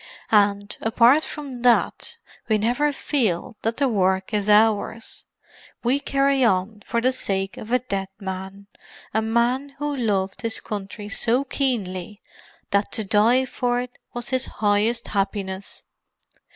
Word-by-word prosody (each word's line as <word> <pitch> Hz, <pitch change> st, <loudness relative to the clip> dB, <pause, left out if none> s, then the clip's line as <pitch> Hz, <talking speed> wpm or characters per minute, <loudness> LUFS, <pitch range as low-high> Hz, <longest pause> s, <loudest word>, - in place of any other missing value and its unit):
And, 205 Hz, -1 st, +3 dB
apart 240 Hz, +6 st, +5 dB
from 275 Hz, -5 st, -6 dB
that, 245 Hz, -1 st, +2 dB, 0.3 s
we 215 Hz, -, +4 dB
never 245 Hz, +8 st, +1 dB
feel 235 Hz, -, -1 dB
that 225 Hz, +1 st, -1 dB
the 275 Hz, 0 st, +2 dB
work 190 Hz, -3 st, +1 dB
is 210 Hz, 0 st, +1 dB
ours. 220 Hz, +1 st, +2 dB, 0.6 s
We 255 Hz, +4 st, +2 dB
carry 275 Hz, -1 st, +2 dB
on 205 Hz, 0 st, +1 dB
for 235 Hz, 0 st, 0 dB
the 255 Hz, +2 st, +3 dB
sake 195 Hz, -6 st, -2 dB
of 220 Hz, -, -9 dB
a 250 Hz, -, +5 dB
dead 200 Hz, -6 st, -3 dB
man—a 195 Hz, +2 st, -6 dB
man 240 Hz, +5 st, 0 dB
who 295 Hz, 0 st, -2 dB
loved 200 Hz, -6 st, -1 dB
his 230 Hz, -1 st, -1 dB
country 205 Hz, 0 st, -6 dB
so 235 Hz, +4 st, +1 dB
keenly 210 Hz, -8 st, -2 dB, 0.5 s
that 200 Hz, 0 st, +1 dB
to 220 Hz, -, -1 dB
die 225 Hz, +6 st, +4 dB
for 245 Hz, -1 st, -1 dB
it 250 Hz, 0 st, -7 dB
was 240 Hz, 0 st, -6 dB
his 260 Hz, 0 st, 0 dB
highest 215 Hz, +3 st, +1 dB
happiness. 195 Hz, -1 st, -2 dB
225 Hz, 140 wpm, -23 LUFS, 200-250 Hz, 0.6 s, apart